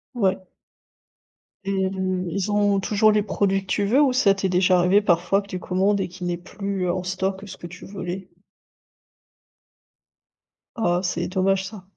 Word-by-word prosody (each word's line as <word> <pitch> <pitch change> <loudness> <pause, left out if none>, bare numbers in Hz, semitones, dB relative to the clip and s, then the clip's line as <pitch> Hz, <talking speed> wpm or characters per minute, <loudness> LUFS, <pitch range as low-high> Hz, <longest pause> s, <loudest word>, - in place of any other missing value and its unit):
Ouais. 190 -4 +1 1.2
Et 190 -1 0
mmh, 185 -1 -2
ils 195 +4 -2
ont 205 -1 +2
toujours 215 +2 +3
les 210 -1 +2
produits 195 -2 0
que 195 - -17
tu 205 - +1
veux? 250 +8 +4
Ou 275 -3 +4
ça 220 -6 +4
t'est 195 -1 -2
déjà 180 0 +3
arrivé, 185 +4 +4
parfois, 180 0 +2
que 200 - -16
tu 185 -2 -5
commandes 195 +3 +1
et - - -1
qu'ils 180 0 -6
n'aient 175 - 0
plus 195 0 -4
en 180 +1 -1
stock 190 +1 -2
que 205 - -11
ce - - -8
que 175 - -8
tu 175 +1 -11
voulais? 190 -1 -6 2.5
Ah, 175 -6 +1
c'est 180 - -1
dommage, 190 +1 +1
ça. 200 -2 -10
190 Hz, 175 wpm, -23 LUFS, 185-200 Hz, 2.5 s, veux